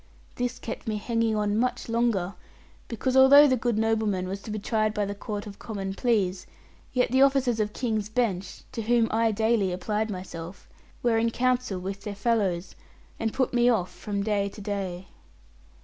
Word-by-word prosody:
This 245 0 -2
kept 225 - -7
me 215 -1 -1
hanging 230 +1 0
on 210 0 +1
much 250 +1 -1
longer; 230 -6 0 0.5
because 255 +3 -2
although 275 +2 +9
the 260 -3 +4
good 240 -2 -1
nobleman 220 -4 +1
was 195 +1 -5
to - - -10
be 215 - -3
tried 215 0 0
by 210 - +1
the 200 - -3
Court 205 +1 -5
of 200 -1 -10
Common 195 -4 -4
Pleas, 195 -5 0 0.4
yet 250 -2 +1
the 260 +1 +4
officers 270 -4 +3
of 210 -1 0
King's 220 -3 -2
Bench, 215 -5 -2
to 230 - -4
whom 230 +1 +3
I 225 0 +2
daily 220 -2 +1
applied 210 +4 -2
myself, 180 -2 -7 0.4
were 230 -2 +3
in 230 +1 +2
counsel 250 -4 0
with 195 +2 -5
their 205 -1 -5
fellows, 200 -5 0 0.5
and 225 -1 0
put 260 +1 0
me 240 0 +4
off 200 -7 +1
from 200 -1 -3
day 200 -1 0
to 205 - -12
day. 195 -3 -4
215 Hz, 180 wpm, -27 LUFS, 200-235 Hz, 0.5 s, although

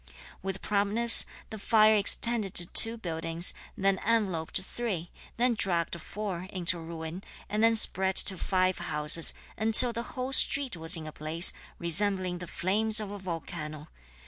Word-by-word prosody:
With 195 0 -8
promptness 210 +3 +2 0.2
(the 220 - -9
fire) 215 +1 +2
extended 215 0 +1
to 175 - +8
two 225 +6 +6
buildings, 165 -3 -2 0.2
then 195 -1 -1
enveloped 195 -8 -2
three, 190 -3 -6 0.3
then 245 +1 0
dragged 170 -5 -3
four 190 -3 -8
(into 175 -2 -1
ruin), 165 +2 -10 0.2
and 210 +2 -4
then 225 0 +2
spread 190 -3 +2
to 190 - +6
five 185 -1 -2
houses, 150 +2 +1 0.2
until 225 +2 +5
the 235 - -6 0.2
whole 255 +1 -5
street 270 -3 +3
was 165 +2 +2
in 160 - -10
a 155 - -9
blaze, 155 +4 +3 0.2
resembling 185 +1 0
the 180 - -10
flames 215 +6 -1
of 210 -2 -8
a 205 - -10
volcano. 155 -4 -9
190 Hz, 150 wpm, -26 LUFS, 170-220 Hz, 0.3 s, to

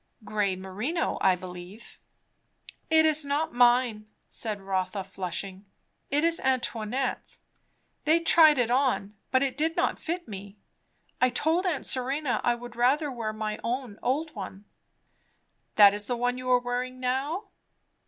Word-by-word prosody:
"Grey 205 -2 0
merino, 210 - -3
I 190 -1 +4
believe." 180 +4 -11 0.9
"It 320 0 +5
is 310 -1 +3
not 290 +3 -1
mine," 240 -3 +3 0.2
said 215 -3 -3
Rotha 190 0 -2
flushing. 190 +1 -5 0.4
"It 290 +2 +1
is 335 0 +3
Antoinette's. 255 -1 -2 0.6
They 320 +2 +4
tried 320 -3 +6
it 240 -2 +1
on, 250 -6 +1 0.2
but 260 +1 +3
it 265 -2 -1
did 320 +3 0
not - - 0
fit 345 +1 -4
me. 200 0 -9 0.6
I 255 - +5
told 320 +9 0
aunt 315 -6 -1
Serena 265 +1 0
I 240 - +2
would 240 0 -10
rather 275 +5 +2
wear 230 -4 -3
my 215 0 -4
own 240 -2 -3
old 300 +5 -1
one." 195 -1 -8 1.1
"That 205 -2 +8
is 205 0 -4
the 245 - -1
one 245 +1 0
you 255 0 -5
are 250 - +6
wearing 245 +1 -3
now?" 280 - -2
245 Hz, 145 wpm, -27 LUFS, 210-285 Hz, 1.1 s, That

